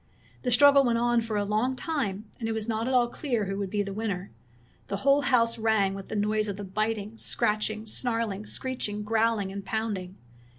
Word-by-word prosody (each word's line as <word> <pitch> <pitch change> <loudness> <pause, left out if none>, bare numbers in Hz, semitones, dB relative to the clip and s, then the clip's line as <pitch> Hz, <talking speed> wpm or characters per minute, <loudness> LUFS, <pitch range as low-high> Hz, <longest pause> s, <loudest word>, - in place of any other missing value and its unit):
The 250 - -1
struggle 280 +3 +7
went 235 -2 +2
on 240 0 +2
for 225 -2 -3
a 205 - 0
long 220 +6 0
time, 225 - -2
and 225 -2 -2
it - - 0
was 220 0 -4
not 225 +1 -1
at 260 - 0
all 245 -1 +4
clear 240 -4 -2
who 195 +1 -3
would 200 -2 -2
be 205 +1 0
the 200 -1 -5
winner. 200 -3 -3 0.6
The 200 - -2
whole 280 +1 +5
house 235 -4 +2
rang 220 -3 +2
with 195 0 -7
the - - -5
noise 215 +1 +1
of 200 -1 -4
the 205 - -6
biting, 215 +2 -3
scratching, 215 -1 -1
snarling, 225 -3 -1
screeching, 210 -5 -1
growling, 220 -2 +1
and 200 0 -6
pounding. 200 -4 -3
220 Hz, 205 wpm, -27 LUFS, 205-235 Hz, 0.6 s, struggle